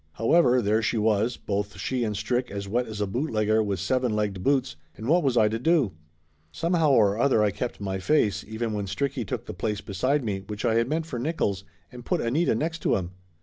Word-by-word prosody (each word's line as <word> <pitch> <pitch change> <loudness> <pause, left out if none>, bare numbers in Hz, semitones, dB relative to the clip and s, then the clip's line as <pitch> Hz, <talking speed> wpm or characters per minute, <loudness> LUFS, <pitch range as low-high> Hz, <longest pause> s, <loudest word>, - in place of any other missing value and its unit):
However, 125 0 +3
there 110 +2 +2
she 115 +2 0
was, 110 +2 +1
both 100 0 -3
she 120 +6 -2
and 105 -2 -2
Strick 120 +4 -1
as 100 0 -5
wet 120 +5 0
as 105 -1 -5
a - - +2
bootlegger 110 -1 +1
with 100 -3 -2
seven 125 +3 0
legged 105 -3 -1
boots, 130 - +1 0.2
and 110 +4 -6
what 170 +5 +4
was 135 -5 +1
I 110 -2 +5
to 110 +1 -2
do? 150 - +2 0.6
Somehow 165 - +1
or 105 -3 +4
other 130 -5 +3
I 105 - +2
kept 120 +6 -4
my 95 -1 -3
face, 105 -4 +1
even 110 +1 -3
when 100 -1 -3
Stricky 140 +4 -2
took 100 - -5
the - - -6
place 105 -2 -2
beside 130 +10 0
me 100 -4 -2
which 105 +2 -5
I 115 - +3
had 115 +2 +1
meant 160 +1 -1
for 130 -7 -5
Nickolls, 110 - -1 0.3
and 125 -1 -10
put - - 0
Anita 140 +9 +1
next 165 +2 -2
to - - +1
him. 90 -2 -3
110 Hz, 225 wpm, -26 LUFS, 105-130 Hz, 0.6 s, I